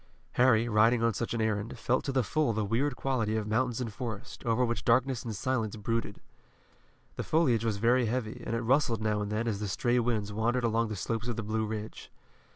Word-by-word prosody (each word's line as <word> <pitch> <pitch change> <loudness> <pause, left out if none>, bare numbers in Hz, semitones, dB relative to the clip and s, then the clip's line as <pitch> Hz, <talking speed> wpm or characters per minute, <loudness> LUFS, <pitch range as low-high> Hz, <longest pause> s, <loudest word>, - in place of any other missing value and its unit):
Harry, 120 -2 +4
riding 115 +2 +4
on 115 -1 +3
such 115 +4 -3
an 115 - -1
errand, 110 +2 -1
felt 125 +3 0
to 135 - -2
the 130 -1 +2
full 145 +1 +1
the 110 -1 -1
weird 125 +8 0
quality 115 -5 -1
of 110 - -2
mountains 115 +3 0
and 115 -4 -4
forest, 110 -2 -6
over 120 +2 +2
which 115 0 -2
darkness 125 +1 +2
and 115 -3 -4
silence 115 -2 -1
brooded. 110 -1 -2 1.0
The - - -2
foliage 130 -9 +2
was 110 -3 0
very 120 +3 +3
heavy, 115 -1 -3
and 115 - -2
it 115 - -1
rustled 120 -3 +2
now 105 -1 +1
and 105 0 -3
then 110 +2 -1
as 105 -3 -1
the 105 - -3
stray 120 +7 +1
winds 110 -4 -1
wandered 120 +4 0
along 115 0 +1
the 110 - -4
slopes 115 +4 -3
of 120 - -2
the 115 - -3
Blue 110 +1 -1
Ridge. 110 0 -6
115 Hz, 220 wpm, -30 LUFS, 110-125 Hz, 1.0 s, Harry